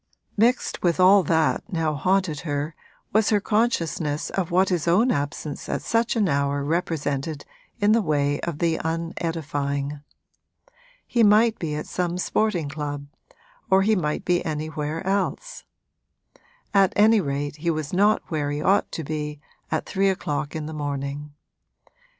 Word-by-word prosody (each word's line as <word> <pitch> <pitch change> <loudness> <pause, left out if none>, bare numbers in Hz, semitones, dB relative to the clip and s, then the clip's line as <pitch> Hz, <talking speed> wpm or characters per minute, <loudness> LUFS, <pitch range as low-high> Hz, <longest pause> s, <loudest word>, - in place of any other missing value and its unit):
Mixed 235 +4 +1
with 175 0 +1
all 190 +2 +7
that 160 -1 +1
now 165 -3 0
haunted 185 0 +1
her 145 +1 -3 0.4
was 215 0 +3
her 210 - +3
consciousness 170 -9 0
of 190 -4 -1
what 185 +2 +3
his 175 -3 -1
own 215 +9 +4
absence 145 0 -3
at - - -2
such 230 +2 +1
an 215 -4 +2
hour 140 -2 0
represented 150 -2 -2 0.3
in 205 0 +3
the 230 +1 +4
way 145 -4 0
of 170 -3 -4
the 165 0 +1
unedifying. 155 -4 -3 1.0
He 240 - +1
might 215 +1 +5
be 155 -3 -3
at 150 - -4
some 180 -1 -2
sporting 180 -3 0
club 145 -1 -5 0.6
or 190 0 +5
he 215 +2 +3
might 150 -5 -2
be 175 -1 +2
anywhere 155 +1 -3
else; 200 - -2 1.1
at 195 -2 +4
any 215 +1 +5
rate 145 -1 -3
he 170 +3 -2
was 155 -1 -2
not 205 +3 +3
where 150 -3 -1
he 145 0 -2
ought 195 +6 +2
to 160 - -3
be 150 0 -4 0.3
at - - -1
three 195 0 +1
o'clock 150 -6 -2
in 155 -1 -3
the 160 - -6
morning. 145 0 -4
160 Hz, 150 wpm, -24 LUFS, 145-195 Hz, 1.1 s, all